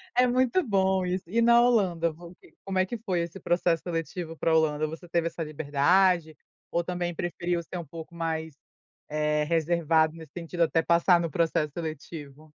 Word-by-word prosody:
É 250 0 +5
muito 255 +8 +2
bom 190 - +1
isso. 180 +1 -2
E 230 +6 +1
na 235 0 +6
Holanda 190 -9 +2
vo 170 +3 -13 0.3
como 190 -1 -3
é 185 - +3
que 230 +4 -6
foi 185 -6 -1
esse 170 +3 -6
processo 175 -1 +1
seletivo 165 -1 -4
pra 160 -1 +2
Holanda, 155 -1 +2
você 165 +3 -8
teve 170 -1 +1
essa 165 0 -4
liberdade 155 +3 +2 0.3
ou 170 0 0
também 175 -1 -3
preferiu 175 0 -2
ser 175 +2 -6
um 170 - -7
pouco 160 +3 -10
mais, 160 -2 -3 0.5
eh, 150 0 0
reservado 160 0 +2
nesse 160 -1 -12
sentido 170 0 -1
até 165 0 +2
passar 170 +2 +4
no 170 - -2
processo 160 -1 0
seletivo? 155 -2 -7
170 Hz, 175 wpm, -27 LUFS, 160-180 Hz, 0.5 s, na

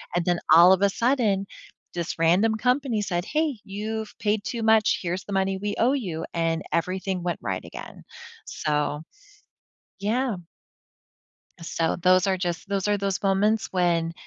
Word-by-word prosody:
And 175 - +1
then 175 -1 +1
all 175 +3 +8
of 190 +1 +4
a 200 - +4
sudden, 225 -4 +1 0.5
this 170 -1 -4
random 185 +7 +3
company 250 -1 0
said, 175 -3 -2
"Hey, 305 -6 -1
you've 215 +2 -5
paid 210 -1 0
too 230 -2 -3
much, 220 -1 +4
here's 180 +1 -3
the 200 - -6
money 190 0 0
we 205 +1 -3
owe 240 +3 +3
you," 175 - -3
and 165 -1 0
everything 185 +2 -1
went 175 -2 -2
right 95 -1 -3
again. - - -10 0.4
So, 150 0 -2 1.0
yeah. 230 +3 0 1.3
So 165 0 -1
those 185 +1 +4
are 190 - +2
just 180 +1 -4
those 200 0 -1
are 205 -1 +2
those 195 -1 -2
moments 205 +3 +2
when 170 -2 +1
195 Hz, 155 wpm, -25 LUFS, 175-220 Hz, 1.3 s, all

